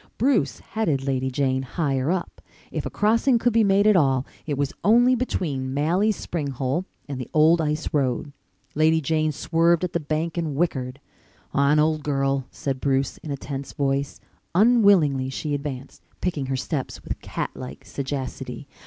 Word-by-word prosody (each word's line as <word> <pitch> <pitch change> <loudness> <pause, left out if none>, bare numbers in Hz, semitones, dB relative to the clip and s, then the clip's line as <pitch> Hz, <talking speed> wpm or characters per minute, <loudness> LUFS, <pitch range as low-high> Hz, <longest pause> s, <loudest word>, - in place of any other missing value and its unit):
Bruce 215 - +1
headed 160 -12 0
Lady 130 -1 0
Jane 130 0 0
higher 135 0 -1
up. 180 0 -2 0.3
If - - -3
a - - -4
crossing 230 +4 +3
could 235 0 +1
be 225 0 +4
made 200 0 +3
at 215 -1 +6
all 135 -6 +3 0.2
it 145 -3 -1
was 140 -1 -1
only 240 +4 +5
between 145 - -2
Malley's 180 +9 +2
spring 165 -5 -4
hole 135 +6 -2 0.2
and 135 -3 -4
the 125 - -7
old 160 +2 +5
ice 150 0 -1
road. 140 +1 0 0.4
Lady 160 +1 +3
Jane 155 +1 +1
swerved 165 +3 +2
at 180 - -2
the 170 - +1
bank 155 +2 -2
and 155 -4 -2
whickered. 135 -5 -1 0.5
"On, 140 +1 +3
old 155 0 +2
girl," 135 -2 0
said 135 -2 -4
Bruce, 135 -1 0
in 155 - -10
a 140 - -2
tense 135 0 -6
voice. 140 0 -1 0.4
Unwillingly 195 - +4
she 145 +3 -3
advanced, 140 -2 -5 0.2
picking 155 -7 -2
her 135 0 -1
steps 135 0 -4
with - - -5
cat - - -4
like 130 - -9
sagacity. 135 0 -5
150 Hz, 170 wpm, -24 LUFS, 135-170 Hz, 0.5 s, at